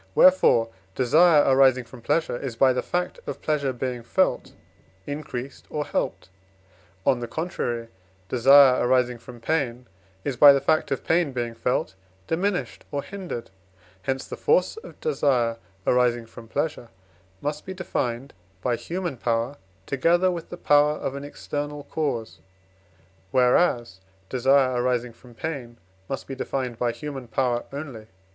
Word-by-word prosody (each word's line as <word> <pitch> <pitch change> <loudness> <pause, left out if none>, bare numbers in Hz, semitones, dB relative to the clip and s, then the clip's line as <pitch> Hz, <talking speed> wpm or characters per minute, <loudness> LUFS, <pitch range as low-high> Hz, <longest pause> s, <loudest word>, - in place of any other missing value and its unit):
Wherefore 120 -11 +5 0.2
desire 150 +4 +5
arising 130 -1 +5
from 120 +1 -13
pleasure 160 +3 0
is, 125 -1 -5
by 130 +2 +4
the 125 - 0
fact 180 - -2
of - - -4
pleasure 145 -3 0
being 125 -1 -4
felt, 115 - 0 0.5
increased 140 -3 -6
or 150 -1 -2
helped; - - -3 0.8
on 130 -3 +3
the 120 - -4
contrary, 120 -7 -3 0.4
desire 130 +3 +6
arising 125 -1 +2
from 120 0 -12
pain 125 -2 -1 0.4
is, 135 -3 -3
by 145 +2 +10
the 140 - +2
fact 155 +3 +1
of 135 - -2
pain 165 -4 +1
being 120 -2 -2
felt, 115 -3 -1 0.3
diminished 180 - -2
or 140 -1 -3
hindered; 185 -10 -7 0.5
hence 130 +6 -2
the - - -5
force 180 - +2
of 455 - -11
desire 125 - +1 0.3
arising 120 -2 +2
from 115 0 -13
pleasure 145 -2 -3 0.5
must 150 +4 -3
be 190 - -7
defined 130 -8 -3 0.3
by 120 - +1
human 175 -3 -4
power 115 +3 -1 0.3
together 175 +7 +2
with 170 -2 -6
the 175 - -7
power 150 -2 +4
of 135 - -4
an 140 0 -6
external 145 0 -5
cause, 140 -8 -3 0.9
whereas 125 - +2 0.3
desire 130 -1 +3
arising 125 -1 0
from 120 +1 -17
pain 125 -5 -5 0.3
must 135 - -4
be 135 - -6
defined 130 -3 -3
by 120 -1 +1
human 135 +1 -7
power 120 0 0
only. 135 -7 -7
130 Hz, 145 wpm, -25 LUFS, 120-150 Hz, 0.9 s, by